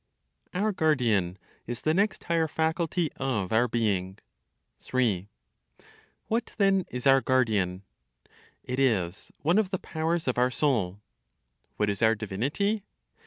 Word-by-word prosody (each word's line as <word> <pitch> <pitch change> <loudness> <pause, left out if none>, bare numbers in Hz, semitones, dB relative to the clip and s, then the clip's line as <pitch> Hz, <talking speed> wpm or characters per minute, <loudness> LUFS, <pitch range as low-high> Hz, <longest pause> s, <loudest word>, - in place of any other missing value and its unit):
OUR 210 +4 +1
GUARDIAN 120 - +1 0.3
IS 120 0 -5
THE 155 - +2
NEXT 200 +3 +1
HIGHER 165 -1 +1
FACULTY 160 +1 0
OF 120 -9 -1
OUR 120 +3 +4
BEING. 100 -5 -1 0.6
3. 110 -8 0 1.0
What 230 +1 -2
then 195 -2 +3
is 125 +1 -5
our 135 -1 +6
guardian? 105 -9 +1 0.8
It 125 +1 -3
is 100 -9 0
one 170 +7 +4
of 210 -4 +1
the 190 - -1
powers 165 -1 -2
of 125 -1 +1
our 125 +1 +4
soul. 115 -9 0 0.8
What 105 - +1
is 100 - -6
our 110 0 +5
divinity? 135 - -1
130 Hz, 130 wpm, -28 LUFS, 105-165 Hz, 1.0 s, our